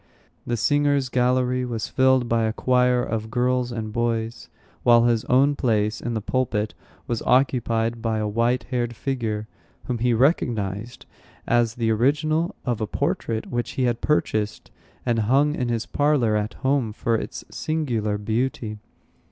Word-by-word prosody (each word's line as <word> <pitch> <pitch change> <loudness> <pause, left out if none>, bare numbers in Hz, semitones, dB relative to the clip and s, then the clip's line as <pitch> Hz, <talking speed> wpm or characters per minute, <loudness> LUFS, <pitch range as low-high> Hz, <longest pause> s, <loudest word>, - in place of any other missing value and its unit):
The 120 - 0
singers' 145 +1 +2
gallery 125 0 +1
was 120 -3 -3
filled 130 -2 +3
by 115 -1 +1
a 110 - 0
choir 125 0 +2
of 110 -1 -3
girls 125 +1 0
and 110 -2 -5
boys, 115 0 -2 0.3
while 120 -1 +5
his 120 -2 +2
own 140 +3 +3
place 110 -4 0
in 120 0 -3
the 110 - -1
pulpit 110 -2 -1 0.3
was 120 -2 -2
occupied 120 -3 +1
by 110 -1 0
a 110 -1 -1
white 115 +4 +1
haired 120 -2 -1
figure, 110 -6 -3 0.4
whom 125 -2 -3
he 120 0 +2
recognized 115 - 0 0.4
as 120 -1 +2
the 115 -2 0
original 150 +8 +1
of 120 -3 -1
a 110 - -1
portrait 110 +3 -2
which 120 -1 -2
he 130 - -1
had 120 -2 0
purchased 110 -8 -1 0.3
and 120 -2 +1
hung 145 +3 +4
in 125 -4 -2
his 115 -1 -1
parlor 145 -7 +2
at 105 +1 -2
home 130 -5 +1
for 115 +2 -1
its 115 - -3
singular 120 -10 -1
beauty. 110 0 -2
120 Hz, 155 wpm, -24 LUFS, 110-130 Hz, 0.4 s, while